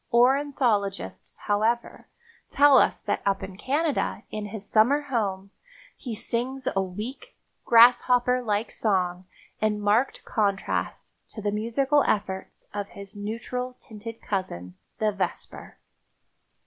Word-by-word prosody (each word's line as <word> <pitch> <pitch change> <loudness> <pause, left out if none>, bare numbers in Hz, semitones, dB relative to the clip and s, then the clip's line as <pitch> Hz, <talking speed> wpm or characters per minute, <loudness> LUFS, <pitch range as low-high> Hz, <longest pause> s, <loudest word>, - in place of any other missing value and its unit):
Ornithologists, 245 -5 +1
however, 220 +3 0 0.4
tell 285 -2 +6
us - - +1
that 205 - -1
up 195 -1 0
in 190 -1 -7
Canada 280 - -1
in 210 -1 -4
his 205 -1 -8
summer 240 +8 +4
home 200 -8 -2 0.4
he 240 -5 -6
sings 255 +4 -2
a 195 - +3
weak, 210 +8 -7 0.3
grasshopper 245 +1 +5
like 215 -1 -1
song 185 -3 -1 0.3
in 215 -1 +1
marked 210 +6 +1
contrast 200 -3 -1
to - - -10
the 205 -1 -1
musical 260 +7 +2
efforts 190 -2 -2
of 205 -1 -3
his 200 0 -11
neutral 235 +4 -4
tinted 225 +1 -10
cousin, 90 - -4 0.2
the 215 -1 +1
vesper. 200 -1 -5
215 Hz, 120 wpm, -26 LUFS, 200-250 Hz, 0.4 s, tell